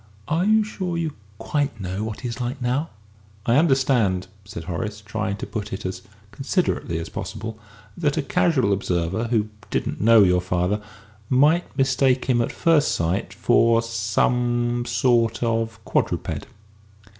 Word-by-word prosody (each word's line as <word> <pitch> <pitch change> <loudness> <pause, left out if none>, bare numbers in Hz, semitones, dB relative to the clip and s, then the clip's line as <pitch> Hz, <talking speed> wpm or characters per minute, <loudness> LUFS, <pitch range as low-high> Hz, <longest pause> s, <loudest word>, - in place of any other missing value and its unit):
"Are 165 +4 +1
you 215 +1 +4
sure 185 -5 -4
you 160 -3 -2 0.2
quite 145 -3 -2
know 95 +2 -3
what 110 -1 -5
he 125 - -3
is 120 +1 -5
like 125 +3 -3
now?" 130 +6 -1 0.6
"I 120 +3 +3
understand," 130 - +2 0.2
said 100 -5 -7
Horace, 105 +5 -4
trying 105 -1 -3
to - - -5
put 105 -2 -5
it 95 +1 -5
as 95 0 -4 0.3
considerately 135 - -1
as 80 - -4
possible, 110 0 -6 0.4
"that 150 -3 0
a 155 - +1
casual 135 - +2
observer, 95 +2 -1
who 110 -2 0 0.2
didn't - - -2
know 115 0 +7
your 90 -1 +3
father, 90 +3 0 0.5
might 150 +4 +3
mistake 130 -1 +2
him, 125 -2 +2
at - - -1
first 160 -4 +3
sight, 85 +3 -1
for 115 +2 +3
for 115 - -4
some 120 +2 0
sort 115 -3 +2
of 115 -1 -1
quadruped." - - -1
115 Hz, 155 wpm, -23 LUFS, 105-135 Hz, 0.6 s, know